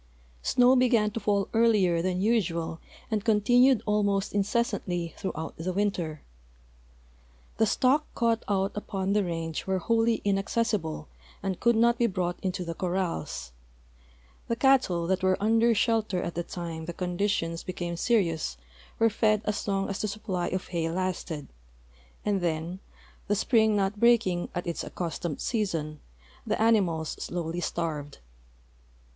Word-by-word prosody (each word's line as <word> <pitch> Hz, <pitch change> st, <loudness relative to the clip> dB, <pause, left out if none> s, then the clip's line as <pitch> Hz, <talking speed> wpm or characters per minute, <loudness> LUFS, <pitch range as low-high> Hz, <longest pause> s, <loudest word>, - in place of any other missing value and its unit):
Snow 250 Hz, -, +4 dB
began 235 Hz, -4 st, +3 dB
to 230 Hz, -, -3 dB
fall 200 Hz, -2 st, +1 dB
earlier 210 Hz, -7 st, +3 dB
than 185 Hz, +1 st, -1 dB
usual 170 Hz, -7 st, 0 dB, 0.3 s
and 215 Hz, -2 st, 0 dB
continued 245 Hz, +3 st, +4 dB
almost 205 Hz, -2 st, +1 dB
incessantly 195 Hz, -5 st, -1 dB
throughout 160 Hz, -5 st, -4 dB
the 170 Hz, +3 st, -2 dB
winter. 180 Hz, -6 st, -2 dB, 1.4 s
'Fhe 220 Hz, -, +4 dB
stock 270 Hz, +7 st, +2 dB
caught 230 Hz, -1 st, +1 dB
out 195 Hz, -1 st, +1 dB
U})on 195 Hz, -2 st, -2 dB
the 210 Hz, -1 st, +3 dB
range 165 Hz, -2 st, -4 dB
were 190 Hz, 0 st, +1 dB
wholly 225 Hz, +4 st, +2 dB
inaccessible 195 Hz, -5 st, 0 dB, 0.4 s
and 190 Hz, -2 st, -2 dB
could 235 Hz, 0 st, +3 dB
not 235 Hz, +1 st, +3 dB
be 235 Hz, -, +4 dB
brought 180 Hz, -3 st, -2 dB
into 185 Hz, -1 st, -2 dB
the 170 Hz, -, -3 dB
cor 180 Hz, +1 st, -3 dB
rals. 80 Hz, -, -3 dB, 1.0 s
'fhe 230 Hz, -, 0 dB
cattle 250 Hz, -10 st, +3 dB
that 190 Hz, +2 st, 0 dB
were 185 Hz, 0 st, +3 dB
under 225 Hz, +2 st, +3 dB
shelter 220 Hz, -5 st, +1 dB
at 170 Hz, -1 st, -3 dB
the 175 Hz, -, -2 dB
time 165 Hz, -2 st, -6 dB
the 175 Hz, -, -5 dB
condi 180 Hz, +3 st, -1 dB
tions 165 Hz, -4 st, -1 dB
became 175 Hz, -2 st, -4 dB
serious 170 Hz, -, 0 dB, 0.4 s
were 225 Hz, -, +4 dB
fed 215 Hz, -1 st, +2 dB
as 210 Hz, 0 st, -2 dB
long 195 Hz, -1 st, 0 dB
as 195 Hz, -, -3 dB
the 215 Hz, -, 0 dB
supply 200 Hz, -4 st, -3 dB
of 185 Hz, 0 st, -3 dB
hay 165 Hz, -2 st, -1 dB
lasted, 175 Hz, -4 st, -3 dB, 0.8 s
and 200 Hz, -2 st, +1 dB
then, 170 Hz, +2 st, -2 dB, 0.5 s
the 205 Hz, -, +2 dB
spring 220 Hz, 0 st, +3 dB
not 200 Hz, +1 st, 0 dB
breaking 230 Hz, -7 st, +3 dB
at 175 Hz, -, -2 dB
its 170 Hz, -1 st, -3 dB
accustomed 170 Hz, -3 st, -4 dB
season, 165 Hz, -10 st, -2 dB, 0.4 s
the -, -, -1 dB
animals 190 Hz, -8 st, +2 dB
slowly 175 Hz, -1 st, -3 dB
starved. 155 Hz, -5 st, -3 dB
195 Hz, 145 wpm, -28 LUFS, 170-220 Hz, 1.4 s, Snow